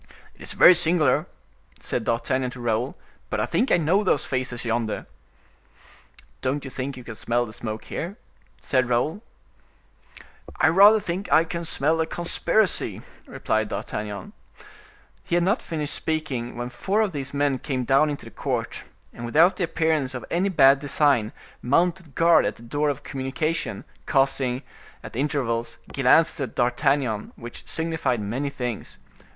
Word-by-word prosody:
"It - - -22
is - - -6
very 180 - +8
singular," 170 -2 +2 0.5
said 115 - -2
D'Artagnan 125 +2 0
to 125 - -10
Raoul, 120 +2 -1 0.3
"but - - -2
I - - +1
think 255 - 0
I - - +6
know 175 +6 +2
those 165 -7 +1
faces 130 -2 -3
yonder." 115 -1 -1 1.4
"Don't 140 +2 -1
you 135 - -7
think 130 +1 -4
you 125 - -9
can 120 - -7
smell 120 +2 0
the 110 - -10
smoke 110 0 -6
here?" 185 +6 -5 0.4
said 130 -2 0
Raoul. 150 - 0 1.4
"I - - +5
rather 200 +6 +7
think 185 +1 -4
I 160 - +6
can 170 +1 -5
smell 160 +1 +1
a 160 - 0
conspiracy," 175 +4 0 0.2
replied - - -1
D'Artagnan. 105 -2 -5 0.9
He - - -1
had 175 - +3
not 200 +6 +1
finished 155 -3 -3
speaking, 135 -7 -3
when 120 0 -4
four 195 - 0
of 210 -3 +1
these 140 -3 -4
men 140 -2 0
came 130 -2 -2
down 135 +5 +3
into 145 - -5
the - - -11
court, - - -3 0.3
and 120 - -9
without 165 +10 +4
the 180 - +1
appearance 155 -6 0
of 125 - -6
any 185 +4 +1
bad 140 -6 +6
design, 140 -6 +2 0.3
mounted 170 +3 +1
guard 165 0 +5
at - - -3
the 115 - -15
door 145 +5 0
of 145 0 -3
communication, 135 +4 -3 0.2
casting, 135 -2 +1 0.4
at - - -9
intervals, 125 -4 -1 0.2
glances 145 +4 +4
at 130 -5 -4
D'Artagnan, 125 -2 0
which 120 0 -10
signified 160 -7 -1
many 120 +8 -2
things. 125 -5 -5
140 Hz, 155 wpm, -24 LUFS, 125-160 Hz, 1.4 s, very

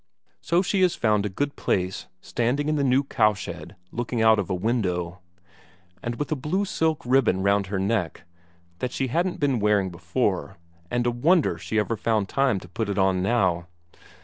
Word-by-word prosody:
So 175 +2 +2
she 195 +1 0
has 180 -2 +3
found 105 -2 +1
a - - -5
good 140 +9 -2
place, 90 0 -1
standing 125 +5 -1
in 155 - +1
the 145 - +1
new 135 +1 +3
cowshed, 105 - -1 0.2
looking 120 0 -3
out 110 -1 +5
of 100 - -2
a 95 - 0
window. 90 -4 -1 0.8
And 120 0 -3
with 145 +5 -4
a - - +2
blue 165 +9 -1
silk 160 -5 0
ribbon 120 -7 +2
round 100 0 +2
her 100 0 -2
neck, 95 -2 -1 0.6
that 125 - -2
she 130 0 -2
hadn't 175 +7 0
been 140 -5 +1
wearing 100 -3 +2
before, 95 +2 -2 0.3
and 120 0 0
a 120 - +2
wonder 160 +8 +2
she 110 - -3
ever 110 +2 +1
found 110 -2 0
time 135 -7 +1
to - - -12
put 105 +5 -3
it 100 - -2
on 95 -1 +2
now. 95 -5 +1
110 Hz, 185 wpm, -25 LUFS, 95-135 Hz, 0.8 s, out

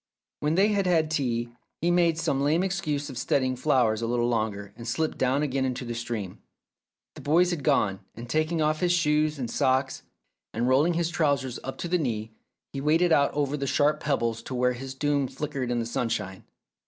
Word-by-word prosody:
When 150 +2 0
they 195 +4 +4
had 200 -3 +1
had 160 -3 +2
tea, 120 -6 -1 0.3
he 170 +2 +1
made 170 -2 +3
some 160 -5 0
lame 155 +5 +2
excuse 155 -7 -2
of 125 - -6
studying 130 -2 +1
flowers 125 -5 +2
a 115 - -1
little 120 0 +1
longer 105 -4 -2
and 115 - -9
slipped 155 +7 -1
down 130 +3 +2
again 130 -2 0
to 125 - -6
the 120 - -4
stream. 115 -5 -5 0.7
The - - -11
boys 175 +5 +3
had 160 -5 -3
gone, 95 -6 +2 0.2
and 120 +2 -8
taking 155 +4 0
off 155 0 +1
his 175 0 +2
shoes 155 -3 +2
and 125 -3 -3
socks, 130 +2 0 0.5
and 120 +2 0
rolling 145 +7 +3
his 170 0 0
trousers 140 -6 0
up 135 - -6
to - - -4
the 180 +1 +1
knee, 110 -6 -2 0.4
he 135 - -4
waded 165 +4 +3
out 140 -3 +4
over 145 -1 0
the 140 -1 -3
sharp 145 +2 +2
pebbles 115 -6 -1
to 130 - -6
where 125 0 +2
his 130 +2 -7
doom 145 -1 0
flickered 140 -3 -4
in 120 - 0
the 115 - -1
sunshine. 115 -5 -3
140 Hz, 205 wpm, -26 LUFS, 120-155 Hz, 0.7 s, they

